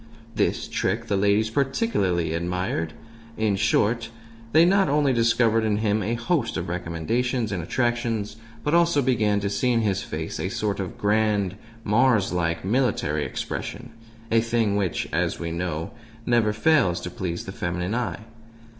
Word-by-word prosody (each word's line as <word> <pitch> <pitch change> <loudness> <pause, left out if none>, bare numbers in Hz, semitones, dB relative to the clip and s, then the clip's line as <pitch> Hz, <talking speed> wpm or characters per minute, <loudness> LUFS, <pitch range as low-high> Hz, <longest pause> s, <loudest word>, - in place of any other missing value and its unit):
This - - 0
trick - - -1
the 100 - 0
ladies 105 +3 +2
particularly 110 - 0
admired. 85 -1 -2 0.4
In 110 -2 +1
short, 115 +4 +1 0.4
they 160 +5 +6
not 195 -2 +3
only 145 -2 +3
discovered 115 -1 +3
in 105 -2 +1
him 105 0 +1
a 115 +2 -1
host 120 +1 -1
of 85 - -4
recommendations 105 - -1
and 95 -3 -2
attractions, 115 +1 -1 0.3
but 150 - 0
also 170 -4 +4
began 105 -5 +2
to 100 - -1
see 100 +5 0
in 115 -1 +2
his 100 -4 0
face - - -5
a - - -2
sort 105 -2 -2
of 95 -3 -5
grand, 105 -2 +1 0.3
Mars 110 -3 +3
like, 85 -1 -1
military 100 - +1
expression 120 0 -5 0.4
a 115 0 +4
thing 115 -3 +1
which, 95 -5 -1
as - - 0
we 85 -1 -3
know, 85 -1 -3 0.3
never 120 -3 +3
fails 110 - +3
to 90 - -6
please 85 -1 -4
the 95 - -6
feminine 90 +1 -3
eye. 120 -2 -2
105 Hz, 155 wpm, -24 LUFS, 90-120 Hz, 0.4 s, they